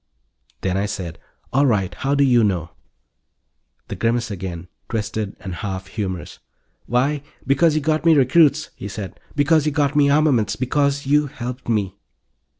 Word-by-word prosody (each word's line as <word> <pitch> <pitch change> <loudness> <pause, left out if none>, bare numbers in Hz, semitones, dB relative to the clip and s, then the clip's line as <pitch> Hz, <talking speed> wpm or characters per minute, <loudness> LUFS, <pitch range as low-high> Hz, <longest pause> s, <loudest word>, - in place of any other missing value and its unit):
Then 95 0 0
I 100 +1 0
said: 90 -5 -5 0.3
"All 140 +2 +4
right. 100 -6 +1
How 140 +2 -1
do 140 - +4
you 120 -4 +4
know?" 90 -5 0 1.2
The - - -5
grimace 115 0 0
again, 90 -2 -6 0.2
twisted 110 -2 -3
and 95 -3 -6
half 95 +1 -4
humorous. 95 -4 -5 0.5
"Why, 135 +4 +1 0.2
because 150 +4 +3
you 155 - +1
got 155 +1 0
me 165 -1 +6
recruits," 150 +2 +4
he 100 - -7
said. 100 -3 -7 0.2
"Because 150 +1 +3
you - - +2
got 145 0 +1
me 145 -1 +4
armaments. 140 -8 +3
Because 140 +2 0
you 145 +2 +3
helped 125 -3 -7
me." 100 -4 0
125 Hz, 155 wpm, -21 LUFS, 100-145 Hz, 1.2 s, me